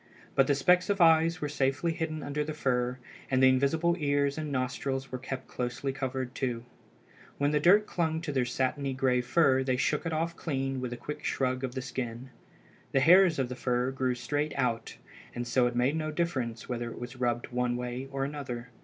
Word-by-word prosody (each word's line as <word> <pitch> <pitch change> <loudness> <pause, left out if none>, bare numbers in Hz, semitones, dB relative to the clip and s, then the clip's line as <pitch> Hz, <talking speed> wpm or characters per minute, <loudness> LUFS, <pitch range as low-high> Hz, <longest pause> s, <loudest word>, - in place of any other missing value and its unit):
But 135 -1 +4
the 145 - +3
specks 180 +7 +3
of 200 0 +1
eyes 165 +1 +5
were 150 - -1
safely 145 +3 0
hidden 160 -2 -3
under 145 +1 -2
the 155 0 -5
fur, 125 -3 0 0.3
and 130 -1 +2
the 130 - +8
invisible 160 +6 +2
ears 140 -1 +1
and 155 -2 -4
nostrils 135 +1 -2
were 130 - -4
kept 130 +1 -5
closely 125 +2 -3
covered 130 -1 -3
too. 120 -3 -3 0.7
When 145 +1 +1
the 150 - +2
dirt 200 +7 +5
clung 160 -4 -1
to 165 - -3
their 130 -3 +1
satiny 135 +2 -1
gray 130 -2 +2
fur 135 0 +3
they 130 -1 0
shook 150 +3 0
it - - -2
off 165 +1 -1
clean 135 -4 -2
with 125 -1 -3
a 120 - -4
quick 150 +4 -7
shrug 130 0 -1
of 130 -1 -3
the 130 - -3
skin. 125 0 -5 0.6
The 135 - +4
hairs 175 +4 +6
of 135 -2 0
the 125 - -6
fur 125 0 0
grew 130 -2 0
straight 145 +5 -2
out, 120 -4 -1 0.4
and 120 0 -3
so 120 +1 +3
it 120 - -3
made 125 +5 +2
no 155 -1 -2
difference 135 -9 -2
whether 120 -1 -3
it - - -9
was 120 +1 -7
rubbed 120 -1 -1
one 125 0 0
way 125 +2 -4
or 135 0 -1
another. 125 -4 -6
135 Hz, 205 wpm, -29 LUFS, 125-150 Hz, 0.7 s, the